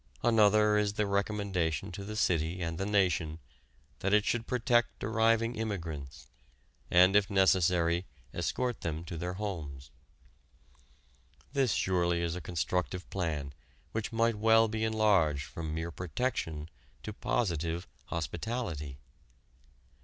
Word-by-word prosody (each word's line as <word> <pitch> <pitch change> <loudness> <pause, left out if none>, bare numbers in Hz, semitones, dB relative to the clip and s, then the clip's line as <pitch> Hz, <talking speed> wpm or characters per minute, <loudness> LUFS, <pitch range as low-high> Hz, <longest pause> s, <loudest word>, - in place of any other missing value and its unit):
Another 105 -2 +5
is 105 -1 0
the 105 0 0
recommendation 100 -5 -1
to 100 +3 -6
the 105 +2 -6
city 85 -4 +1
and 85 -1 -3
the 95 - -1
nation 90 -6 +1 0.6
that 100 +2 +2
it 105 - +3
should 115 -1 -1
protect 120 -1 +1
arriving 115 +1 +2
immigrants, 85 -11 -5 0.6
and 90 +2 +6
if 105 -1 +4
necessary 90 -3 +3 0.3
escort 125 -1 -2
them 80 0 -3
to 85 - -6
their 90 +2 -3
homes. 75 - -5 1.6
This 135 -6 +2
surely 85 -2 +1
is 85 0 -1
a 90 - -5
constructive 90 +4 -2
plan 75 -7 -2 0.4
which 110 -1 -3
might 115 0 +2
well 115 +1 +5
be 110 0 -2
enlarged 100 -10 +3
from 80 -2 -6
mere 80 +2 -3
protection 80 -4 -3 0.4
to 110 - -5
positive 85 -6 -1 0.2
hospitality. 85 - -4
95 Hz, 125 wpm, -31 LUFS, 85-110 Hz, 1.6 s, and